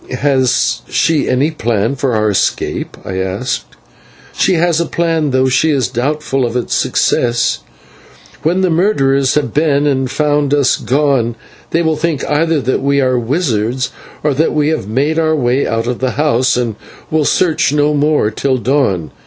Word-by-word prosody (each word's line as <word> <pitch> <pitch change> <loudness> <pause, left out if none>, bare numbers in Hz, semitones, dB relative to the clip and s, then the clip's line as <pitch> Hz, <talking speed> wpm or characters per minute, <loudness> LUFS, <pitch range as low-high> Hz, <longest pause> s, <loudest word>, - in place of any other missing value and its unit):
"Has 130 -3 +1
she 160 -3 +1
any 135 +5 +1
plan 115 -4 -1
for 130 -3 -1
our 110 -1 +1
escape?" 100 - -2
I 95 0 -4
asked. 95 +8 -3 0.7
"She 185 - +1
has 170 0 +2
a 170 - -2
plan, 165 -3 0
though 130 0 +2
she 130 +5 +2
is 135 -6 +1
doubtful 135 +2 -1
of 120 -1 -2
its 125 - -3
success. 120 0 +1 0.8
When 175 +5 +1
the 185 -2 +1
murderers 140 -7 +2
have 150 - -1
been, 145 -1 +2
and 135 -3 0
found 145 0 +1
us 140 -3 +3
gone, 135 -4 0 0.3
they 170 +1 +1
will 160 -1 0
think 155 -3 -2
either 160 +1 +1
that 130 - -1
we 140 0 +1
are 130 -2 +1
wizards 125 - -1 0.3
or 150 -1 +1
that 155 +5 +1
we 150 0 +2
have 155 -11 -2
made 145 +8 0
our 160 -1 +2
way 130 -1 +1
out 115 0 -1
of 125 0 -3
the 130 -1 -1
house, 130 -4 +2
and 115 -4 -2 0.3
will 155 -1 +2
search 160 -1 +1
no 150 0 +2
more 145 -6 +1
till 130 +4 0
dawn. 120 - 0
140 Hz, 170 wpm, -15 LUFS, 125-155 Hz, 0.8 s, us